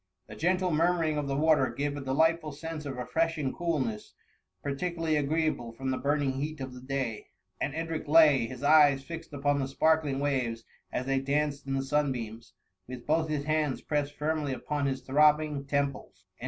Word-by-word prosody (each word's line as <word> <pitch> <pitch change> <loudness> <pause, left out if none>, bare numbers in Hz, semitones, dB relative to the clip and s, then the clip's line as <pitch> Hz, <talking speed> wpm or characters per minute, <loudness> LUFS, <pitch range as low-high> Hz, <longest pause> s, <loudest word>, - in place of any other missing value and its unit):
The - - -11
gentle 180 +2 +1
murmuring 165 -1 +2
of 145 - -3
the 135 - -1
water, 150 -3 +3
gave 145 +4 -2
a 145 - -5
delightful 155 +4 +1
sense 155 0 -6
of 135 - -4
refreshing 155 +2 -1
coolness, 135 -11 -2 0.5
particularly 165 +3 -1
agreeable 150 -5 0
from 130 +3 -3
the 130 - -2
burning 145 -1 +1
heat 155 +1 -4
of 130 -1 -6
the 125 - -10
day; 130 -4 -3 0.3
and 140 - -2
Edric 165 -1 -3
lay, 150 -6 +6
his 130 +3 -9
eyes 145 -2 +6
fixed 165 +2 -8
upon 145 0 0
the 135 - -1
sparkling 150 0 +2
waves 125 -5 -1 0.3
as 125 - -2
they 135 0 +1
danced 140 +1 -1
in 135 - -1
the 135 - 0
sunbeams, 125 -6 -2 0.3
with 125 -1 -8
both 160 +1 +1
his 150 -2 -1
hands 155 -2 0
pressed 145 -1 -1
firmly 150 -2 -1
upon 145 +2 -2
his 135 -1 -2
throbbing 150 +1 +3
temples, 140 -9 -2
en. - - -37
145 Hz, 180 wpm, -29 LUFS, 135-155 Hz, 0.5 s, lay